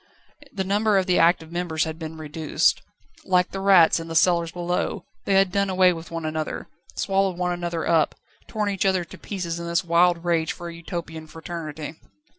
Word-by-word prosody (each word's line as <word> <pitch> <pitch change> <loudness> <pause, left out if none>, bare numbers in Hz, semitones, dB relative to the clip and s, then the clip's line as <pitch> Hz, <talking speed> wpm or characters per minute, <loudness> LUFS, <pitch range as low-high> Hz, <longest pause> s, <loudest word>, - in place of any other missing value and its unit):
The 195 -8 -2
number 205 +2 +2
of 190 - +2
the 180 -1 +2
active 165 -1 +3
members 170 -2 -1
had 160 0 -5
been 160 -1 -7
reduced. 155 0 0 0.4
Like 180 -1 +2
the 195 - -4
rats 190 -4 +5
in 165 - -7
the 165 - -6
cellars 170 0 +3
below, 175 0 -2 0.2
they 195 - +2
had 195 -1 +4
done 200 0 +1
away 185 -1 +4
with 165 0 -9
one 165 -1 -5
another, 155 0 -3 0.3
swallowed 195 -2 0
one 180 0 0
another 175 -1 -3
up, 165 -2 +2 0.3
torn 210 -2 -1
each 195 - -1
other 190 -2 +2
to 170 - -12
pieces 175 -4 -4
in 170 - -5
this 170 +2 +1
wild 170 0 +3
rage 165 -2 +1
for 175 0 -8
a - - -8
Utopian 170 -2 -6
fraternity. 160 -1 -7
170 Hz, 195 wpm, -24 LUFS, 165-185 Hz, 0.4 s, rats